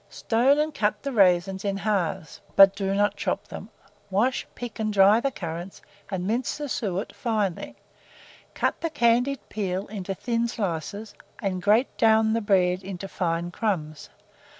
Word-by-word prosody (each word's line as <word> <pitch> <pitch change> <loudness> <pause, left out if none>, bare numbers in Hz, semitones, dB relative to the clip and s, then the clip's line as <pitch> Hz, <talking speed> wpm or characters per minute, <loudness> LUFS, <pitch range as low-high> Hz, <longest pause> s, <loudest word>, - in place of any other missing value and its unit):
Stone 250 +5 +2
and 305 +1 0
cut 210 -4 -1
the 280 - -2
raisins 190 -3 +3
in 200 -1 -1
halves, 195 -3 -2
but 195 0 +8
do 195 -1 -1
not 205 +1 +2
chop - - -3
them; - - -8 0.4
wash, 225 +7 0
pick, 240 -3 -7
and 215 -1 0
dry 200 +2 +6
the 275 - 0
currants, 175 -4 -7 0.3
and 185 -2 -3
mince 235 +5 -1
the 295 -1 -4
suet 200 -6 -3
finely; 210 -7 -2 0.8
cut - - -1
the 330 - -1
candied 250 -1 +1
peel 195 -2 -3
into 195 -2 -5
thin 235 +3 -1
slices, 205 0 -4 0.3
and 190 -4 -2
grate 215 +7 +2
down 220 0 +4
the 230 - 0
bread 185 -3 +2
into 195 0 -7
fine 175 -2 -2
crumbs. 165 -8 -3
205 Hz, 155 wpm, -25 LUFS, 185-230 Hz, 0.8 s, but